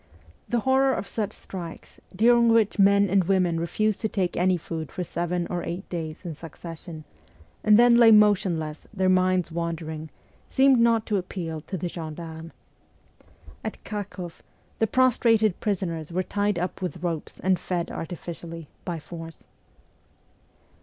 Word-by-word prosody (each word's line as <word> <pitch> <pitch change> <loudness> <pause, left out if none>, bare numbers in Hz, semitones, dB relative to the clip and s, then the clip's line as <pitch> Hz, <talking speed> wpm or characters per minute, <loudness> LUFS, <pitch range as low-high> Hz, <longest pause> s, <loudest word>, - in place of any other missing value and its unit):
The 240 -1 +1
horror 265 +2 +3
of - - -4
such 215 -3 -2
strikes, 175 -4 -8 0.2
during 235 +3 +5
which 225 -2 +3
men 200 +1 +5
and 190 -1 +2
women 180 -3 +2
refused 215 +5 0
to 220 - 0
take 185 -4 -1
any 180 +1 +2
food 160 -3 -6
for 180 - -3
seven 175 +1 -2
or 175 -1 -3
eight 180 +3 -5
days 160 0 -5
in 170 - -4
succession, 165 +1 -9 0.6
and 210 -1 +6
then 240 0 +6
lay 235 -1 +8
motionless, 185 -8 +3
their 190 -3 +1
minds 185 -1 +2
wandering, 160 -2 -4 0.4
seemed 265 -1 +5
not 230 -1 +3
to 210 - 0
appeal 170 -4 -4
to 190 +4 -5
the 175 - -3
gen 160 -3 -6
darmes. 165 0 -8 1.1
At - - -6
Kharkoff, 190 -5 -6 0.4
the 225 - +3
prostrated 225 -5 +3
prisoners 175 -6 -2
were 185 +2 0
tied 205 +1 0
up 180 +2 -3
with 180 -1 -4
ropes 165 -3 -3
and 190 -1 +2
fed 175 -2 -3
artificially, 165 -1 -7 0.2
by 175 -2 -3
force. 165 0 -10
180 Hz, 150 wpm, -25 LUFS, 165-210 Hz, 1.1 s, lay